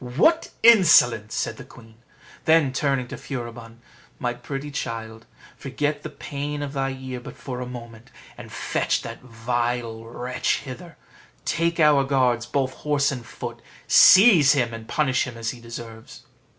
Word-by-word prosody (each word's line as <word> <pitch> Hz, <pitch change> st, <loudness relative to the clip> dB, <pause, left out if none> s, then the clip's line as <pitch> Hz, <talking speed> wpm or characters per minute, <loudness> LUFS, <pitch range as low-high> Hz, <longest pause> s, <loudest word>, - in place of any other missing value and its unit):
"What 175 Hz, -, +2 dB
insolence!" 150 Hz, -, +5 dB
said -, -, -2 dB
the -, -, -9 dB
queen: 115 Hz, -1 st, -16 dB, 0.5 s
then 160 Hz, -5 st, +4 dB
turning 135 Hz, -2 st, 0 dB
to -, -, -7 dB
Furibon, 120 Hz, -3 st, -8 dB, 0.4 s
"My 120 Hz, -1 st, -2 dB
pretty 135 Hz, +4 st, -7 dB
child, 115 Hz, -4 st, -6 dB, 0.3 s
forget 145 Hz, +2 st, -3 dB
the 155 Hz, -, -7 dB
pain 145 Hz, 0 st, -5 dB
of 140 Hz, -1 st, -6 dB
thy 135 Hz, -1 st, -1 dB
ear 130 Hz, -1 st, -7 dB
but 125 Hz, -, -11 dB
for 125 Hz, -2 st, -6 dB
a 125 Hz, -, -5 dB
moment, 120 Hz, 0 st, -10 dB, 0.3 s
and -, -, -11 dB
fetch -, -, -1 dB
that -, -, -8 dB
vile 120 Hz, -1 st, -3 dB
wretch 125 Hz, +2 st, -2 dB
hither; 165 Hz, +5 st, -10 dB, 0.5 s
take 170 Hz, 0 st, 0 dB
our 150 Hz, -3 st, +5 dB
guards, 125 Hz, -3 st, +1 dB
both 130 Hz, 0 st, -1 dB
horse 145 Hz, -2 st, 0 dB
and 125 Hz, -3 st, -6 dB
foot, -, -, -8 dB, 0.3 s
seize 185 Hz, -, +7 dB
him, 120 Hz, -5 st, 0 dB
and 115 Hz, 0 st, -8 dB
punish 140 Hz, -6 st, +1 dB
him 120 Hz, -3 st, -8 dB
as 115 Hz, -1 st, -3 dB
he 125 Hz, -, -11 dB
deserves." 115 Hz, -1 st, -10 dB
130 Hz, 155 wpm, -23 LUFS, 120-145 Hz, 0.5 s, seize